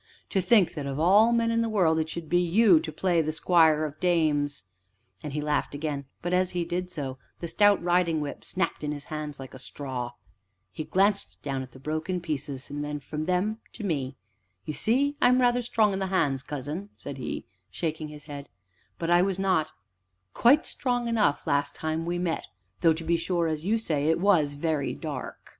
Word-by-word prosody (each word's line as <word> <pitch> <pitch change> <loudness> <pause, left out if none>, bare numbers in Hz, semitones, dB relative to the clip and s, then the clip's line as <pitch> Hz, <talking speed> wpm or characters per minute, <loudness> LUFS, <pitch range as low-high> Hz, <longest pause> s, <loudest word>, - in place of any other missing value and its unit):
To 190 - +2
think 190 0 +4
that 145 -3 -4
of 135 +1 -3
all 205 +8 +6
men 230 -1 +2
in 230 0 +2
the 230 - 0
world 175 -7 +3
it 160 0 -1
should 165 -1 -6
be 175 +3 +3
you 180 0 +5
to 155 - -5
play 170 +2 +1
the 155 0 -1
squire 160 -1 +4
of 150 0 -7
dames!" 150 -5 +1 0.6
And 150 - -5
he 150 - -1
laughed 150 -1 -1
again, 145 -2 -3 0.2
but, 175 +1 -1
as 185 0 +3
he 170 - 0
did 180 +2 -3
so, 135 -6 -5 0.2
the 170 - -4
stout 205 +3 +4
riding 175 -2 +2
whip 145 -1 -5
snapped 185 -4 -2
in 150 0 -1
his 145 -1 -7
hands 150 -1 -5
like 135 -1 -9
a 130 - -10
straw. 130 -3 -5 0.6
He 155 - -5
glanced 200 +2 +1
down 135 -2 -2
at 130 - -8
the 130 - -14
broken 155 +6 -2
pieces, 145 -5 -4
and 145 0 -4
from 155 +2 -4
them 185 +5 0
to 225 - -8
me. 140 -8 -2 0.5
"You 155 - -3
see, 280 - +1
I - - +6
am 250 +1 +4
rather 245 0 +3
strong 220 -3 +2
in 190 - -2
the 190 - -1
hands, 145 -8 +1
cousin," 150 +8 -5
said - - -8
he, - - -4 0.2
shaking 160 -2 -3
his 150 -1 -10
head, 145 -2 -8 0.5
"but 170 0 -2
I 175 0 +6
was 190 0 0
not 190 -5 +1 0.6
quite 275 +6 +5
strong 245 -2 -1
enough, 210 -11 +2
last 140 0 0
time 160 +1 -2
we 175 0 -1
met, 175 -2 -2 0.3
though, 165 -2 +5
to 160 +1 -6
be 170 +1 +2
sure, 170 0 0
as 155 0 -3
you 220 +4 +2
say, 155 -9 -1
it 160 - +3
was 170 -7 +3
very 145 -1 -1
dark. 145 -5 -6
165 Hz, 205 wpm, -27 LUFS, 150-190 Hz, 0.6 s, all